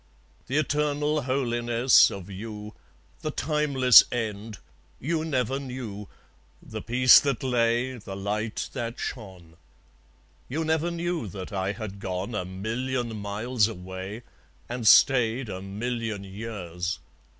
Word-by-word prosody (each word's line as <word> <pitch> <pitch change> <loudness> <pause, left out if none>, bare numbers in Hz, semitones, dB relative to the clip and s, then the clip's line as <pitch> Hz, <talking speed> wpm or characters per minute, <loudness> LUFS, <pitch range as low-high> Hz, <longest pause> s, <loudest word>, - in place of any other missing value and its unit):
The 135 - -1
eternal 150 0 +1
holiness 120 -2 +3
of 95 -2 -8
you, 105 +2 -7 0.5
The 155 - -3
timeless 145 -5 +5
end, 110 -3 -4 0.4
you 160 +3 -1
never 135 -4 -1
knew, 125 -7 -6 0.5
The - - -8
peace 125 +1 +7
that 140 -4 -2
lay, 120 0 +1
the 95 -2 -8
light 105 +3 -3
that 120 -2 -4
shone. 95 -8 -7 0.9
You 160 +5 -2
never 160 +1 +1
knew 170 -5 -2
that 95 0 -7
I 95 +1 -1
had 100 -2 -7
gone 95 +4 -4
A 105 -4 -2
million 115 +5 -3
miles 105 +2 0
away, 95 +2 -7 0.4
and 120 -2 -3
stayed 120 0 +5
A 95 -1 -5
million 110 +1 -4
years. 95 -4 -5
115 Hz, 120 wpm, -26 LUFS, 100-130 Hz, 0.9 s, peace